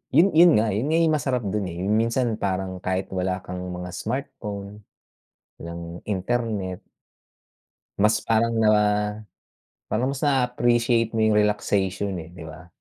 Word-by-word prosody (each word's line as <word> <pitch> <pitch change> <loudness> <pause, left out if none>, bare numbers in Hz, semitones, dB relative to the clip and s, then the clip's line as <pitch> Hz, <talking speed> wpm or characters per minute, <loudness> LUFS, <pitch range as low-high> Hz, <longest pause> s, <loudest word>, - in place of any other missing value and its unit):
yun 190 +4 +6
yun 170 +1 +7
nga 110 0 +2
yun 110 +8 -1
nga 160 +2 +2 0.2
masarap 125 -4 -1
dun, 100 -2 -1
eh, 85 - -6
minsan 115 +3 +1
parang 95 -1 -2
kahit 95 +1 -2
wala 95 0 -2
kang 90 0 -6 0.2
mga 90 0 -6
smartphone, 105 -5 -5 0.7
ng 85 +1 -8
internet. 105 -2 -2 1.2
Mas 105 +1 +4
parang 115 +1 +2
na, 110 -1 +4 1.2
parang 125 +5 0
mas 140 - -4
na-appreciate 120 -4 +2
mo 110 - +1
yung 110 -1 +4
relaxation, 100 -2 0
eh, 80 - -7
'di 85 - -10
ba? 80 +2 -10
105 Hz, 135 wpm, -24 LUFS, 95-120 Hz, 1.2 s, yun